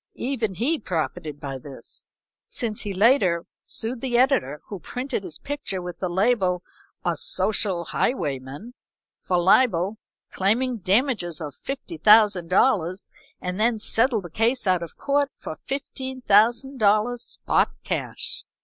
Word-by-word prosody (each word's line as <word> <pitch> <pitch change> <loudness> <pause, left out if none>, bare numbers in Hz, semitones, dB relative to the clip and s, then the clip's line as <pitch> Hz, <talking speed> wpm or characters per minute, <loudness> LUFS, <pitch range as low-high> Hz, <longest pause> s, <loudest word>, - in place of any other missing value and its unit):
Even 235 -6 -2
he 285 - 0
profited 160 - -3
by 135 -2 -5
this, 135 0 -10 0.4
since 220 -3 -3
he 205 - -4
later 190 -4 +3 0.2
sued 230 +2 -2
the 245 -3 0
editor 195 - +2
who 200 - -7
printed 250 +1 -4
his 170 -5 -7
picture 280 -9 -4
with 180 -1 -7
the 185 - -1
label 185 -2 +1 0.4
"A - - +1
Social 195 -5 0
Highwayman" 145 - -2 0.5
for 180 - 0
libel, 190 +1 +3 0.3
claiming 235 +6 +1
damages 195 - +1
of 150 -3 -6
$50,000, 210 - +2 0.3
and 180 +2 -3
then 225 0 +2
settled 225 0 +3
the 175 - -9
case 230 +7 +1
out 185 -2 +2
of 170 - -8
court 285 0 +1
for 155 - -7
$15,000, 245 -3 +1
spot - - 0
cash. - - -3
210 Hz, 125 wpm, -24 LUFS, 180-250 Hz, 0.5 s, later